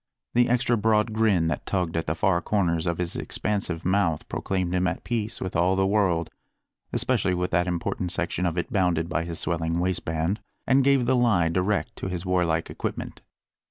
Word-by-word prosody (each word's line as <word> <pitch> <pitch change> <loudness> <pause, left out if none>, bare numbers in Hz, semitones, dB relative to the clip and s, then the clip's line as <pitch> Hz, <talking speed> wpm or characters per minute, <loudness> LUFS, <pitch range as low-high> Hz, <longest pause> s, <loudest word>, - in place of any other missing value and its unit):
The 120 0 +4
extra 120 0 +2
broad 110 +1 +2
grin 105 -7 +2
that 75 - -4
tugged 90 -4 -1
at 80 - -1
the 80 - 0
far 90 0 +2
corners 85 -4 0
of 85 -1 0
bis 90 -1 -3
expansive 100 -5 -2
mouth 90 -4 +1
proclaimed 95 -2 -2
him 90 0 +2
at 90 - -3
peace 110 -3 -2
with 95 - -4
all 90 +3 +3
the 95 0 +2
world 95 -5 +1 0.6
especially 90 - +1
with 90 0 -2
that 90 +1 +2
important 90 0 -2
section 90 +2 -1
of 85 0 -3
it 85 - -3
bounded 90 -4 +1
by 85 -1 -1
his 85 0 -4
swelling 80 0 -1
waistband 90 +1 -1 0.3
and 135 +1 +4
gave 135 -2 +3
the 130 - +3
lie 105 -9 +3
direct 100 +6 0
to - - -4
his 90 0 -4
warlike 85 -3 +1
equipment. - - -5
90 Hz, 190 wpm, -25 LUFS, 85-105 Hz, 0.6 s, The